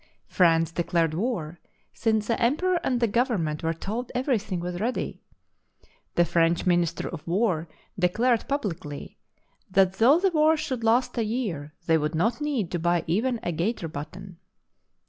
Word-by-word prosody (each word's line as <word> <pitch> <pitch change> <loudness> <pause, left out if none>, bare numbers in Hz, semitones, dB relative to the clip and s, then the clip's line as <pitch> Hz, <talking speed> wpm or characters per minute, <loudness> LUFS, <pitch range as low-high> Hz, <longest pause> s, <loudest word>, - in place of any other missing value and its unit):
France 165 -2 +3
declared 170 -1 0
war, 175 -5 -2 0.3
since 220 -2 +1
the 230 - -1
emperor 345 +9 +2
and 250 -6 +1
the 235 - +2
government 200 - 0
were 165 - 0
told 215 +9 -4
every 250 -2 +1
thing 195 -4 -4
was 175 0 -4
ready. 240 +5 -2 0.9
The 175 - +4
French 170 0 +2
Minister 175 -2 +1
of 170 - -6
War 175 -3 +1 0.3
de 180 0 +3
clared, 235 +4 +1
publicly, 175 - -4 0.5
that 190 0 +3
" - - -19
though 275 +8 +6
the 385 0 +2
war 315 0 +4
should 260 -6 -3
last 235 +2 +2
a - - +2
year, 200 - -3
they 160 -1 +3
would 150 +2 -2
not 225 - 0
need 270 - -1
to 175 - -1
buy 175 +1 +1
even 230 +8 0
a 175 - -1
gaiter 175 +3 -2
button." 175 +4 -8
190 Hz, 165 wpm, -26 LUFS, 170-240 Hz, 0.9 s, though